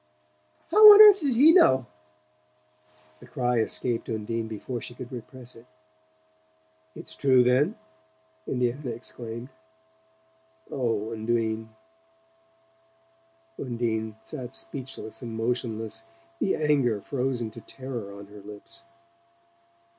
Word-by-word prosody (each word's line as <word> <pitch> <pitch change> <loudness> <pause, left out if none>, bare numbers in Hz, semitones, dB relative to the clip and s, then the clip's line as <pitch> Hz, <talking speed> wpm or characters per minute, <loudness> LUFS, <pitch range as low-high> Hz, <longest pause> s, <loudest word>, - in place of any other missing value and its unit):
"How 425 0 +11
on - - +7
earth 415 -2 +10
did 275 -6 0
he 290 +7 +7
know?" 130 - +5 1.3
The - - -15
cry 125 -3 0
escaped 115 +2 -2
Undine 110 +1 -3
before 115 +3 -6
she 120 - -9
could 125 0 -9
repress 125 0 -10
it. 115 +2 -16 1.3
"It's - - -9
true, 130 -2 +4
then?" 135 - +2 0.7
Indiana 125 +2 -2
exclaimed. 115 +1 -7 1.2
"Oh, 115 -4 -2
Undine 110 0 -2 1.0
" 335 0 -38
Undine 115 -3 -3
sat 125 0 -8
speechless 130 -5 -8
and 115 -2 -6
motionless, 115 - -3 0.3
the 195 - +1
anger 140 -8 +1
frozen 125 -1 -3
to - - -11
terror 125 -6 -7
on 100 - -10
her 105 0 -13
lips. 105 - -10
125 Hz, 110 wpm, -26 LUFS, 115-145 Hz, 1.3 s, How